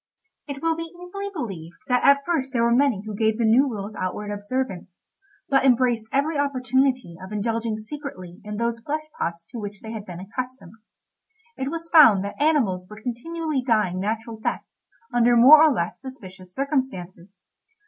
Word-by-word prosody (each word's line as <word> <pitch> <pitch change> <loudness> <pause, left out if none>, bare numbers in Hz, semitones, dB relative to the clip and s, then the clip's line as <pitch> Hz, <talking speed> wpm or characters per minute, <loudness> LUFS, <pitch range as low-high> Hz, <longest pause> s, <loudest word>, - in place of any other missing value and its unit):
It 280 0 -7
will 330 0 +2
be 330 0 -6
easily 395 +3 -6
believed 190 - -6
that 250 -2 +2
at 280 0 +5
first 275 -6 -1
there 235 -2 +2
were 235 0 +3
many 250 -6 +2
who 215 - -5
gave 220 +1 +1
the 235 - +1
new 250 +6 +4
rules 210 -2 -5
outward 205 +2 -4
observance, 205 -4 -4 0.4
but 270 -1 +3
embraced 245 -4 +2
every 285 +2 +1
opportunity 260 -7 0
of 190 - -9
indulging 225 +1 -1
secretly 215 -7 -8
in 210 0 -6
those 235 0 -1
flesh 300 +6 -3 0.2
pots 170 0 -3
to 235 - -6
which 205 -1 -7
they 220 - -8
had 215 -2 -7
been 175 -1 -7
accustomed. 250 0 -6 0.8
It 265 - -3
was 330 +1 -5
found 225 - +7
that 200 - -7
animals 230 -13 +2
were 210 0 -10
continually 295 +5 -3
dying 215 -7 +1
natural 225 +3 -3
deaths - - -2 0.5
under 240 0 +4
more 285 +6 +9
or 315 - +6
less 260 - -2
suspicious 190 -9 -11
circumstances. 195 - -3
235 Hz, 170 wpm, -24 LUFS, 205-275 Hz, 0.8 s, more